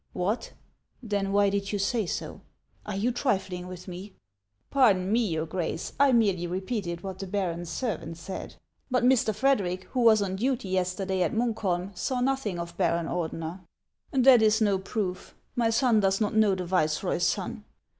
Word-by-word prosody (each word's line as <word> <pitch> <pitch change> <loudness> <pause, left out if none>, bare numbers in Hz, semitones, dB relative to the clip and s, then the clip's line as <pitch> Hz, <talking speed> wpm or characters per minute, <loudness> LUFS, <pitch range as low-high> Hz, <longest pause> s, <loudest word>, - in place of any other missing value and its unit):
" - - -42
What! 210 +6 -2 0.5
Then 200 -3 -1
why 200 0 +3
did 200 -1 -2
you 205 - 0
say 205 +1 0
so? - - -5 0.5
Are 210 - -3
you 220 +6 +1
trifling 190 -8 -1
with 180 0 -9
me? 185 +2 -8 0.2
" 100 0 -55
" 105 +2 -47
Pardon 205 -9 +4
me, 230 0 +2
your 160 -3 -1
Grace! 165 0 -3
I 280 -1 +6
merely 200 -7 +2
repeated 185 -1 -3
what 190 -1 -6
the 195 - -5
baron's 175 -3 -2
servant 170 -9 -3
said. 185 +3 -7 0.3
But 255 -1 +1
Mr. 250 -3 +4
Frederic, 195 -7 +1
who 255 - -1
was 220 -3 +5
on 190 -1 -3
duty 245 -2 -1
yesterday 185 +1 -1
at 175 - +1
Munkholm, 200 -5 -1
saw 255 +7 -1
nothing 250 -7 0
of 170 0 -6
Baron 170 -2 +1
Ordener." 165 +1 -3 0.5
•' 260 -2 +3
That 255 -3 +8
's 220 0 +4
no 205 -3 +2
proof! 190 -2 -4 0.2
My 235 -2 +2
son 230 -1 +3
does 195 -1 +2
not 210 -2 0
know 215 -3 +4
the 185 -1 -4
vice 155 -4 +1
roy's - - 0
son. - - -3
195 Hz, 185 wpm, -27 LUFS, 180-225 Hz, 0.5 s, That